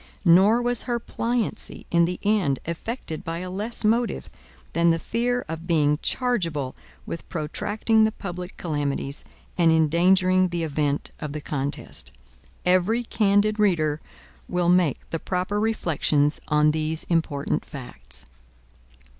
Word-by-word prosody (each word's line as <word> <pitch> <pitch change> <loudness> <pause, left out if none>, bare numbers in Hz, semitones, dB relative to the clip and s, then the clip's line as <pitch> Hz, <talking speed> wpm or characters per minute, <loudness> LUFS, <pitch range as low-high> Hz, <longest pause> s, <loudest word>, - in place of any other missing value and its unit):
Nor 195 +8 +6
was 245 -1 +2
her 240 - +1
pliancy 235 -1 -3
in 170 0 +4
the 180 +1 -3
end 200 -10 +2
effected 170 -1 -5
by 165 0 -3
a 180 +1 -5
less 210 +6 -1
motive, 230 +2 +1 0.4
than 170 0 +3
the 165 - +3
fear 245 +6 -1
of 165 +1 -6
being 150 -3 +2
chargeable 170 - -1 0.3
with 165 - -7
protracting 205 +7 +1
the 220 - +3
public 180 -3 -7
calamities, 145 -3 -3 0.4
and 165 -1 +5
endangering 185 +4 +4
the 175 -1 -2
event 145 -2 -1
of 150 -2 -5
the 150 - -3
contest. 145 -1 -4 0.5
Every 185 +6 +3
candid 210 -1 +2
reader 155 -7 +2 0.5
will 180 -1 +1
make 175 -6 +2
the 165 - -1
proper 185 +4 -1
reflections 155 -8 +1
on 150 0 +4
these 155 +1 -1
important 160 -4 0
facts. 75 - -10
175 Hz, 130 wpm, -24 LUFS, 155-210 Hz, 0.5 s, Nor